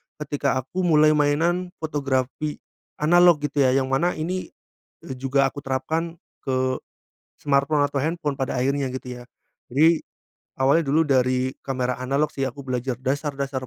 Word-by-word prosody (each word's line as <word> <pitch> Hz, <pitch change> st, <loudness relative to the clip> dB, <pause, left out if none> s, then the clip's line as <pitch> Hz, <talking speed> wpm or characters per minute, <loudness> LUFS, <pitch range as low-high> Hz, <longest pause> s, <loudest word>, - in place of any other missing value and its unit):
ketika 145 Hz, -2 st, -1 dB
aku 180 Hz, +8 st, -6 dB
mulai 155 Hz, -1 st, +5 dB
mainan 160 Hz, +5 st, +1 dB
fotografi 145 Hz, -1 st, -2 dB, 0.4 s
analog 175 Hz, 0 st, +5 dB
gitu 145 Hz, 0 st, -1 dB
ya, 130 Hz, -1 st, +4 dB
yang 135 Hz, 0 st, 0 dB
mana 170 Hz, +7 st, +1 dB
ini, 180 Hz, +4 st, -3 dB, 0.6 s
eee, 130 Hz, -, -6 dB
juga 135 Hz, +1 st, +2 dB
aku 145 Hz, -, -8 dB
terapkan 160 Hz, +6 st, -2 dB, 0.3 s
ke, 130 Hz, -1 st, +1 dB, 0.7 s
smartphone 145 Hz, +1 st, +2 dB
atau 140 Hz, -, -2 dB
handphone 155 Hz, -3 st, -2 dB
pada 130 Hz, -1 st, -2 dB
akhirnya 135 Hz, 0 st, 0 dB
gitu 125 Hz, -1 st, -6 dB
ya. -, -, -11 dB, 0.5 s
Jadi, 160 Hz, +5 st, +4 dB, 0.5 s
awalnya 140 Hz, +5 st, +3 dB
dulu 160 Hz, +3 st, +4 dB
dari 130 Hz, -1 st, +1 dB
kamera 125 Hz, -2 st, -1 dB
analog 140 Hz, +4 st, 0 dB
sih, 135 Hz, -, -3 dB
aku 140 Hz, +2 st, -6 dB
belajar 125 Hz, 0 st, -2 dB
dasar-dasar 140 Hz, -1 st, -2 dB
140 Hz, 145 wpm, -23 LUFS, 130-155 Hz, 0.7 s, mulai